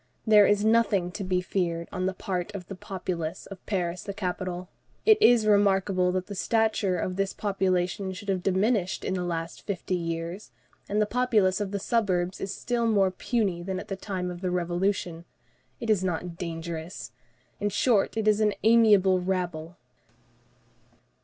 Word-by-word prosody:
There 210 -2 +7
is 205 0 +2
nothing 215 -5 +3
to 195 +3 -5
be 185 -1 0
feared 170 -3 -2
on 185 0 -1
the 190 - -2
part 185 +1 -3
of 185 -3 -6
the - - -6
populace 180 -4 -5
of 195 -2 -11
Paris 180 -3 -1
the 200 - -6
capital. 180 -2 -3 0.4
It 435 -1 +6
is 240 - +6
remarkable 195 -3 +3
that 185 0 -1
the 205 - -7
stature 215 -2 +1
of 185 +2 -3
this 195 0 0
population 190 -1 -1
should 205 +2 -10
have 190 -2 0
diminished 195 +1 0
in - - -1
the 180 -1 -1
last 165 -1 -4
fifty 190 -2 -4
years; 170 +2 -3 0.4
and 210 - +1
the 210 - +3
populace 215 -5 +2
of 205 - -2
the 200 - -2
suburbs 190 -4 0
is 195 - -3
still 235 +2 -1
more 200 -4 +3
puny 195 -3 -1
than 185 +1 -3
at - - -9
the 195 - -2
time 185 -2 -4
of 175 0 -8
the 185 - -1
Revolution. 175 -1 -1 0.6
It 230 - 0
is 195 -3 +2
not 175 -1 -2
dangerous. 165 0 -6 0.5
In 205 - 0
short, 220 0 +2
it 220 -1 0
is 215 0 +4
an 210 -1 +2
amiable 210 -5 +5
rabble." 180 -3 -3
190 Hz, 170 wpm, -27 LUFS, 180-205 Hz, 0.6 s, There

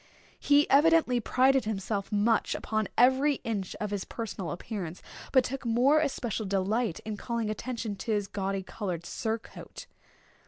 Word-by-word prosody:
He 290 +1 +4
evidently 295 -3 +4
prided 260 +4 +3
himself 200 -1 -3
much 210 +2 +2
upon 215 -2 -1
every 265 +4 +4
inch 205 -5 -3
of 210 -1 -3
his 200 -2 -2
personal 205 -6 -5
appearance, 180 -2 -6 0.3
but 260 -2 +5
took 270 +2 -4
more 250 +6 +4
especial 240 -8 -2
delight 200 +1 0
in 215 -1 -5
calling 230 -2 -2
attention 230 -2 -4
to 225 - -4
his 205 -2 +1
gaudy 195 -1 -3
colored 180 -4 -5
surtout. 220 +3 -5
220 Hz, 145 wpm, -29 LUFS, 200-255 Hz, 0.3 s, but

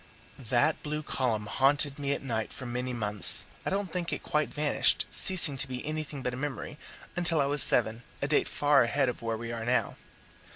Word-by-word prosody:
That 125 +6 +1
blue 150 0 -4
column 115 -7 -2
haunted 140 +5 +1
me 140 -1 -2
at - - -6
night 110 -5 -4
for 130 - -10
many 125 +1 -4
months; 105 -4 +4 0.2
I - - -3
don't 195 -2 -4
think 180 -2 -3
it - - -5
quite 150 0 -2
vanished, 150 0 +1
ceasing 170 -7 +4
to 140 - +2
be 125 -1 -7
anything 155 -2 -5
but 125 - -3
a - - -6
memory, 145 +2 -6 0.4
until 175 -2 +1
I 140 - +2
was 145 0 0
seven 115 -1 +4 0.2
a 140 - -2
date 145 - +1
far 145 -1 +2
ahead 130 +2 0
of 125 - -7
where 115 -1 -3
we 115 +1 -7
are 115 -1 -6
now. 125 +2 -1
140 Hz, 205 wpm, -28 LUFS, 120-150 Hz, 0.4 s, months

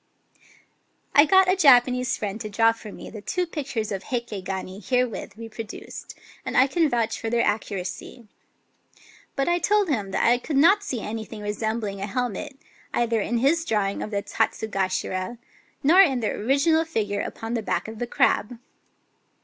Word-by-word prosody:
I 290 - +7
got 380 +4 +5
a 370 - +4
Japanese 250 -6 +4
friend 210 +1 -4
to 215 - -5
draw 225 +2 +4
for 225 -2 -10
me - - -10
the 215 - -8
two 360 - -1
pictures 275 -10 -4
of 195 -1 -4
Heike 235 -6 -4
gani 190 0 -5
herewith 250 -3 -1
reproduced; 225 -1 -8 0.3
and - - -3
I 255 - +7
can 320 +3 +1
vouch 230 -3 -1
for 225 - -3
their 235 0 +2
accuracy. 210 +2 -4 1.1
But 275 - 0
I 345 0 +2
told 410 0 +2
him 210 -9 -1
that - - 0
I 245 +1 +4
could 280 +2 -2
not 365 +8 +6
see 260 - -3
anything 220 0 -6
resembling 210 -1 -3
a 200 - -2
hel 245 +4 -1
met, 210 +6 -6 0.4
either 230 -2 +1
in 240 +3 -1
his 290 +7 +2
drawing 205 -9 -1
of - - -4
the 200 -1 -2
Tatsugashira, 190 -1 -2 0.5
nor 340 +7 +7
in 270 -9 +3
the 220 - -1
original 280 +8 +2
figure 210 -11 -2
upon 225 +1 -5
the 230 - 0
back 210 - -2
of 220 0 -8
the 240 - -2
crab. 235 0 +1
230 Hz, 175 wpm, -24 LUFS, 210-275 Hz, 1.1 s, I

